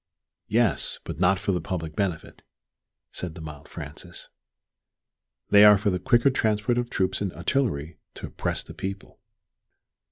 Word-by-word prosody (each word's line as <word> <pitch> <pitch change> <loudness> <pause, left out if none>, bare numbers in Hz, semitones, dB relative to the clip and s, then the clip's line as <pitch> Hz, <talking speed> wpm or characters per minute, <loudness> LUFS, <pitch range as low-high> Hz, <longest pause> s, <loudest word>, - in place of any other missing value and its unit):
"Yes 110 -7 +2
but 85 -2 -7
not 95 +2 +4
for 100 - -2
the 90 -3 -1
public 80 -3 -5
benefit," 95 -6 -3 0.7
said 85 -3 -6
the - - -9
mild 75 -2 -10
Francis; - - -9 1.2
"they 100 0 +8
are 105 -1 +9
for 100 +1 0
the 90 - -1
quicker 130 +3 +3
transport 110 0 +1
of 120 -1 -3
troops 95 -2 -1
and 100 -3 -1
artillery 85 - -1 0.2
to - - -7
oppress - - -3
the - - -11
people." 95 +1 -7
95 Hz, 150 wpm, -25 LUFS, 85-110 Hz, 1.2 s, are